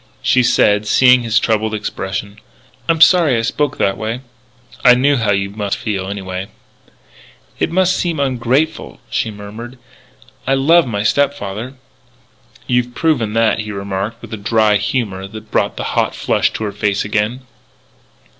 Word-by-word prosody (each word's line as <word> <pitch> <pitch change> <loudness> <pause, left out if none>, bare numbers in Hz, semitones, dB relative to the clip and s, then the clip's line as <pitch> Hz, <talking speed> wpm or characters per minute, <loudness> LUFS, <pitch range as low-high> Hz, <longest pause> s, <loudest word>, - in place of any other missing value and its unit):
She 130 - +4
said, 105 -3 +3
seeing 125 +2 +5
his 115 0 0
troubled 110 -1 +1
expression: 100 -1 -5 0.5
"I'm 165 -1 +2
sorry 165 -8 +6
I 115 - -1
spoke 145 +4 -1
that 95 - 0
way." 115 +3 -3 0.6
"I 125 - +8
knew 140 +3 +3
how 115 -5 +1
you 100 0 0
must 100 -1 -3
feel, 100 -4 -3
anyway." 95 -1 -5 1.1
"It - - +1 0.2
seems 175 -3 0
ungrateful," 135 +3 -1
she - - -1
murmured. 110 +4 -9 0.7
"I 135 - +3
love 160 +4 +4
my 105 -3 -2
step 140 +6 +2
father." 110 +4 -6 0.9
"You've 125 0 0
proven 130 -10 0
that," 115 0 +2
he 110 -1 -4
remarked 100 +3 -4
with - - -9
a - - -3
dry 105 0 +2
humour 105 -3 -2
that 110 +1 -11
brought - - 0
the - - -3
hot - - 0
flush - - +1
to - - -4
her 105 - -2
face 100 0 -1
again. 105 +4 -1
110 Hz, 155 wpm, -17 LUFS, 105-125 Hz, 1.1 s, I